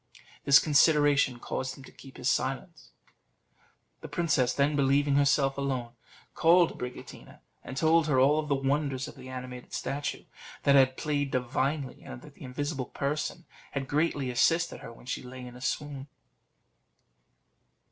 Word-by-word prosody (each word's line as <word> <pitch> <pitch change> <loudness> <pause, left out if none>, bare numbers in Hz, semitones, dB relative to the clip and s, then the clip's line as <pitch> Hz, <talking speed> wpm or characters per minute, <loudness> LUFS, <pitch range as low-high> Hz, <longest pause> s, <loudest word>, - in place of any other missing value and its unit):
This 140 0 +8
consideration 145 -3 +4
caused 130 +2 -4
him 135 - -12
to - - -13
keep 135 - -14
silence. 135 +6 -2 1.1
The - - -8
princess, 155 -8 +1
then, 140 +3 +1
believing 140 +1 +2
herself 140 -1 +2
alone, 130 -4 -2 0.4
called 170 +1 +4
Abricotina 125 0 -9 0.2
and 130 - -8
told 160 +1 +3
her 135 -4 +3
all 145 +4 +4
the 150 -2 0
wonders 135 -1 -1
of - - -9
the 130 -1 -11
animated 125 -1 -8
statue; 140 +2 -3 0.4
that 140 - +5
it - - +8
had 130 0 +3
played 145 -2 -1
divinely, 130 +2 -2
and 65 - -9
that - - -13
the - - -22
invisible 135 +1 -3
person 150 +4 -3 0.3
had 135 -1 -3
greatly 145 -3 0
assisted 165 +8 +2
her - - -9
when 115 - -15
she 130 - -3
lay 125 0 -9
in 125 0 -10
a 125 - -12
swoon. 140 +1 -3
140 Hz, 150 wpm, -29 LUFS, 130-145 Hz, 1.1 s, This